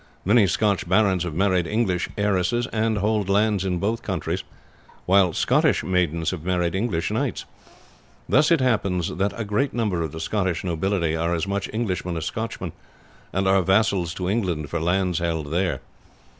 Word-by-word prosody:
Many 105 Hz, +1 st, +5 dB
Scotch 100 Hz, 0 st, 0 dB
barons 95 Hz, -2 st, +3 dB
have 80 Hz, -3 st, -5 dB
married 95 Hz, -2 st, +2 dB
English 100 Hz, -4 st, 0 dB
heiresses, 105 Hz, +3 st, +1 dB
and 110 Hz, 0 st, +1 dB
hold 105 Hz, -1 st, 0 dB
lands 105 Hz, -1 st, +2 dB
in 90 Hz, -2 st, -1 dB
both 110 Hz, +6 st, -1 dB
countries, 90 Hz, -1 st, -3 dB, 0.6 s
while 95 Hz, -1 st, +4 dB
Scottish -, -, +2 dB
maidens 85 Hz, -3 st, 0 dB
have 90 Hz, -4 st, -6 dB
married 90 Hz, -1 st, 0 dB
English 95 Hz, -4 st, -1 dB
knights. -, -, -2 dB, 0.8 s
Thus 150 Hz, +2 st, +4 dB
it 165 Hz, -4 st, +3 dB
happens 100 Hz, -9 st, 0 dB
that 100 Hz, +4 st, -1 dB
a 110 Hz, -, -2 dB
great 105 Hz, +7 st, -1 dB
number 105 Hz, -8 st, 0 dB
of 80 Hz, -3 st, -3 dB
the 80 Hz, -, -7 dB
Scotch 90 Hz, -1 st, -1 dB
nobility 85 Hz, -1 st, 0 dB
are 85 Hz, +1 st, 0 dB
as 85 Hz, -, -1 dB
much 100 Hz, 0 st, -2 dB
Englishmen 90 Hz, -6 st, -2 dB
as 80 Hz, -, -3 dB
Scotchmen, -, -, -4 dB, 0.6 s
and 95 Hz, +1 st, 0 dB
are 95 Hz, 0 st, +4 dB
vassals 95 Hz, -2 st, +1 dB
to 90 Hz, -, -3 dB
England 90 Hz, -8 st, -1 dB
for 85 Hz, -, -1 dB
lands 90 Hz, +1 st, +1 dB
held 80 Hz, -4 st, -2 dB
there. 90 Hz, +1 st, 0 dB
95 Hz, 170 wpm, -23 LUFS, 85-105 Hz, 0.8 s, Many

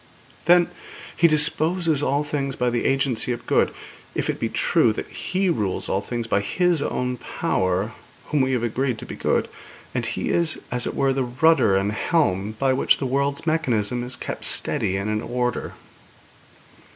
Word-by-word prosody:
'Then, 175 Hz, +1 st, +6 dB, 0.5 s
He 170 Hz, -, +5 dB
disposes 155 Hz, +1 st, +2 dB
all 145 Hz, +1 st, +1 dB
things 140 Hz, -2 st, -2 dB
by 125 Hz, 0 st, 0 dB
the 120 Hz, -, -1 dB
agency 135 Hz, -3 st, +1 dB
of 120 Hz, -, -8 dB
good, -, -, +2 dB, 0.4 s
if -, -, 0 dB
it -, -, -9 dB
be -, -, -1 dB
true 115 Hz, -, +2 dB
that -, -, -5 dB
He 190 Hz, +1 st, -1 dB
rules 105 Hz, -, -1 dB
all 95 Hz, -, 0 dB
things 120 Hz, +2 st, -4 dB
by 100 Hz, -, +1 dB
His 175 Hz, -, +1 dB
own 125 Hz, -2 st, -2 dB
power 95 Hz, -1 st, -1 dB, 0.4 s
whom 150 Hz, -2 st, +2 dB
we 130 Hz, 0 st, +1 dB
have 120 Hz, -2 st, 0 dB
agreed 120 Hz, +1 st, -1 dB
to -, -, -7 dB
be -, -, -7 dB
good; -, -, 0 dB, 0.5 s
and -, -, -1 dB
He -, -, -2 dB
is, 170 Hz, -2 st, +1 dB
as 125 Hz, -1 st, 0 dB
it -, -, -4 dB
were, 135 Hz, -1 st, +2 dB
the 135 Hz, 0 st, 0 dB
rudder 125 Hz, -3 st, +3 dB
and 100 Hz, +2 st, +1 dB
helm 110 Hz, -, 0 dB
by 135 Hz, +2 st, +2 dB
which 130 Hz, -, +3 dB
the 135 Hz, -, -3 dB
world's 140 Hz, +3 st, -1 dB
mechanism 125 Hz, -8 st, 0 dB
is 125 Hz, +1 st, -2 dB
kept -, -, -6 dB
steady 95 Hz, -, +1 dB
and 100 Hz, +2 st, -3 dB
in 110 Hz, 0 st, -1 dB
order.' 125 Hz, -1 st, -2 dB
130 Hz, 180 wpm, -23 LUFS, 115-150 Hz, 0.5 s, Then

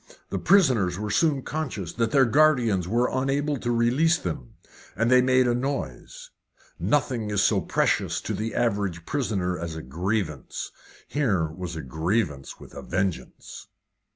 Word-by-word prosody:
The -, -, -1 dB
prisoners 125 Hz, -, +3 dB
were 105 Hz, 0 st, -3 dB
soon 145 Hz, +1 st, +2 dB
conscious 130 Hz, -, -4 dB
that 115 Hz, -1 st, 0 dB
their 135 Hz, +2 st, +4 dB
guardians 120 Hz, -, +3 dB
were 120 Hz, +5 st, +2 dB
unable 140 Hz, +3 st, 0 dB
to 120 Hz, -, -4 dB
release 125 Hz, +8 st, +3 dB
them, 80 Hz, -, -6 dB, 0.4 s
and 115 Hz, +2 st, +1 dB
they 125 Hz, 0 st, +7 dB
made 130 Hz, 0 st, +3 dB
a 120 Hz, -, +2 dB
noise. 125 Hz, -, -4 dB, 0.5 s
Nothing 115 Hz, -, 0 dB
is 105 Hz, -1 st, +1 dB
so 100 Hz, -4 st, +3 dB
precious -, -, 0 dB
to -, -, -4 dB
the 110 Hz, +1 st, -3 dB
average 100 Hz, -8 st, -1 dB
prisoner 95 Hz, -, -1 dB
as 85 Hz, -1 st, -5 dB
a 80 Hz, -, -6 dB
grievance; 85 Hz, -, -3 dB, 0.4 s
here 110 Hz, -, +1 dB
was 90 Hz, +1 st, -6 dB
a 80 Hz, -, -5 dB
grievance 80 Hz, -, -2 dB
with -, -, -13 dB
a -, -, -7 dB
vengeance. 95 Hz, -1 st, -4 dB
110 Hz, 155 wpm, -25 LUFS, 90-130 Hz, 0.5 s, they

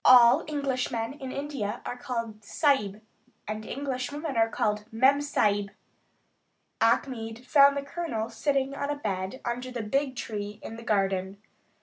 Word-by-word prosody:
All 250 Hz, +4 st, +8 dB
Englishmen 265 Hz, -5 st, -1 dB
in 270 Hz, -3 st, -7 dB
India 270 Hz, -7 st, -3 dB
are -, -, -3 dB
called 230 Hz, -4 st, -4 dB
Sahib 215 Hz, -5 st, +1 dB, 0.4 s
and 215 Hz, +1 st, -4 dB
English 255 Hz, +1 st, -3 dB
women 295 Hz, -1 st, -4 dB
are 225 Hz, 0 st, +3 dB
called 210 Hz, -1 st, 0 dB
Mem 265 Hz, +5 st, +4 dB
sahib. 205 Hz, -8 st, +1 dB, 1.1 s
Achmed 230 Hz, 0 st, +1 dB
found 280 Hz, +1 st, +6 dB
the 280 Hz, -, -2 dB
Colonel 280 Hz, -7 st, -3 dB
sitting 275 Hz, +3 st, 0 dB
on 280 Hz, 0 st, -3 dB
a 290 Hz, -, 0 dB
bed 195 Hz, -2 st, -3 dB
under 245 Hz, +2 st, -2 dB
a 230 Hz, -, -2 dB
big 270 Hz, +5 st, 0 dB
tree 210 Hz, -3 st, -5 dB
in 225 Hz, -, -6 dB
the 230 Hz, -, -9 dB
garden. 195 Hz, -3 st, 0 dB
240 Hz, 145 wpm, -28 LUFS, 215-280 Hz, 1.1 s, All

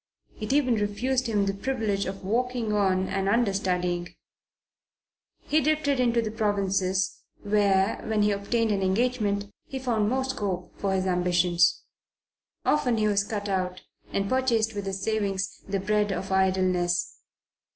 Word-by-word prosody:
It 215 Hz, -, -3 dB
even 260 Hz, -5 st, +3 dB
refused 240 Hz, +5 st, 0 dB
him 205 Hz, -3 st, +1 dB
the 195 Hz, -, 0 dB
privilege 210 Hz, -2 st, -1 dB
of 195 Hz, +1 st, -6 dB
walking 235 Hz, +1 st, -1 dB
on 190 Hz, -2 st, +2 dB
and 195 Hz, 0 st, -1 dB
understudying. 185 Hz, -5 st, 0 dB, 1.3 s
He 310 Hz, +1 st, +1 dB
drifted 300 Hz, -2 st, +1 dB
into 235 Hz, -2 st, +2 dB
the 215 Hz, -, -3 dB
provinces, 195 Hz, -3 st, 0 dB, 0.2 s
where, 200 Hz, -1 st, +2 dB
when 215 Hz, -1 st, +2 dB
he 210 Hz, -, +3 dB
obtained 215 Hz, +3 st, 0 dB
an 200 Hz, -1 st, 0 dB
engagement, 205 Hz, 0 st, 0 dB, 0.2 s
he 270 Hz, -, -5 dB
found 230 Hz, -5 st, 0 dB
more 260 Hz, +2 st, 0 dB
scope 200 Hz, -9 st, -3 dB
for 195 Hz, -1 st, 0 dB
his 190 Hz, 0 st, 0 dB
ambitions. 175 Hz, -2 st, +2 dB, 0.8 s
Often 250 Hz, -6 st, +2 dB
he 215 Hz, -1 st, +2 dB
was 205 Hz, 0 st, 0 dB
out, 190 Hz, -3 st, -2 dB, 0.3 s
and 195 Hz, 0 st, -1 dB
purchased 230 Hz, -3 st, +1 dB
with 200 Hz, -1 st, -4 dB
his 195 Hz, 0 st, -4 dB
savings 200 Hz, -3 st, -1 dB
the 195 Hz, 0 st, -1 dB
bread 210 Hz, +1 st, +1 dB
of 190 Hz, +1 st, -4 dB
idleness. 185 Hz, -2 st, +1 dB
205 Hz, 140 wpm, -26 LUFS, 190-230 Hz, 1.3 s, even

